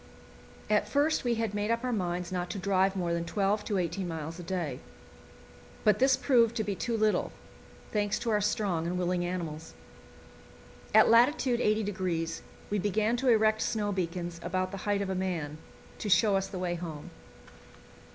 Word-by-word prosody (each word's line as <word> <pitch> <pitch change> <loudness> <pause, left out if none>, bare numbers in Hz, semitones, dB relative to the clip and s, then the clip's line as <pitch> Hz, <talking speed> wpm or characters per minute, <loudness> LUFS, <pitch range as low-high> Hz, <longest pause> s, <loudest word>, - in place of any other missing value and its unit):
At 210 -1 +1
first 295 +2 +2
we 240 -1 +1
had 225 -2 -2
made 205 +1 -1
up 230 +1 0
our 250 -1 -1
minds 180 -3 -2
not 180 -1 -2
to - - -4
drive 195 0 +2
more 175 -3 -1
than 170 0 -1
twelve 200 +4 0
to 205 - -1
eighteen 180 +1 -2
miles 165 0 -5
a - - -6
day; 170 -7 -3 1.0
but 210 - +4
this 265 0 +4
proved 235 -4 +3
to 220 - 0
be 205 -1 -2
too 230 +4 -2
little, 215 -1 +1 0.6
thanks 205 -1 0
to 230 - -2
our 210 -1 +2
strong 190 -5 0
and 180 +1 -2
willing 180 0 0
animals. 165 -3 -5 1.2
At 220 - +7
lat. 240 +6 +6
80° 200 -9 0 0.3
we 210 - +1
began 210 +4 +1
to 260 +1 +1
erect 220 -1 +4
snow 210 -2 -1
beacons, 175 -2 -3
about 185 +1 -2
the 195 - -5
height 200 -1 +1
of 195 - -4
a - - 0
man, 170 -5 -3 0.4
to 210 - -3
show 195 +3 +4
us 195 0 0
the 195 - -7
way 180 -1 -1
home. 165 -4 -7
195 Hz, 180 wpm, -29 LUFS, 175-215 Hz, 1.2 s, At